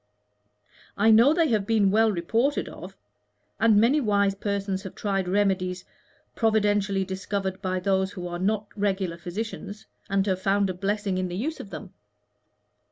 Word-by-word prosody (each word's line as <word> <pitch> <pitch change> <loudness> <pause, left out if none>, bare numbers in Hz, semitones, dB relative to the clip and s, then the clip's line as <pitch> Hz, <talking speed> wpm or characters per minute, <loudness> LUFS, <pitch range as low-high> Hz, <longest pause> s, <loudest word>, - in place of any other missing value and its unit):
"I 220 +2 +5
know 230 +6 +6
they 325 0 +2
have 210 -4 0
been 210 -4 +3
well 220 +1 +4
reported 225 - 0
of, - - -10 0.6
and 220 -2 +5
many 260 +7 +3
wise 200 -4 +2
persons 200 -1 -3
have 190 - -9
tried 195 -3 -1
remedies 185 -1 0 0.5
providentially 205 -3 +1
discovered 190 0 -4
by 185 -1 -1
those 190 +1 0
who 180 -2 -6
are 175 0 -5
not 210 +3 0
regular 190 -4 -1
physicians, 205 +3 -6 0.2
and 195 0 +1
have 185 -2 -1
found 195 0 +1
a - - -5
blessing 195 0 -2
in 185 - -1
the 175 0 -5
use 310 +9 -3
of 200 - -8
them. - - -9
200 Hz, 160 wpm, -26 LUFS, 190-215 Hz, 0.6 s, know